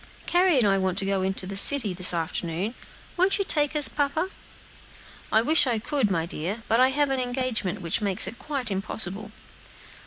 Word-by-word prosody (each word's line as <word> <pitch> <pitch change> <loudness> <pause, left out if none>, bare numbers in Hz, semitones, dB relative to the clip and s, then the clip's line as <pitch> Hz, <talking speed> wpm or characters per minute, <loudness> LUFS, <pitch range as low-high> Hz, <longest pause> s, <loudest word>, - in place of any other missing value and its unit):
"Carry 355 -3 +2
and 245 - +3
I 195 -1 +1
want 190 -1 -2
to 195 - -1
go 190 -1 -1
to 190 - -2
the 195 +1 -7
city, 215 -1 +6
this 180 0 +4
afternoon; 170 +4 -4 0.4
won't 370 +2 +2
you 395 - -2
take 295 -3 0
us, 295 -2 +4
papa?" 300 +6 -2 1.0
"I 220 - +3
wish 300 +1 +4
I 240 -3 0
could, 255 0 -1
my 165 -4 -1
dear, 185 +7 -5
but 225 - +1
I 255 +1 +4
have 285 +1 -1
an 265 - -1
engagement, 245 -8 -3
which 170 +5 -2
makes 200 -3 +3
it 235 - -7
quite 275 -7 -5
impossible." 195 +1 -3
220 Hz, 190 wpm, -24 LUFS, 190-280 Hz, 1.0 s, city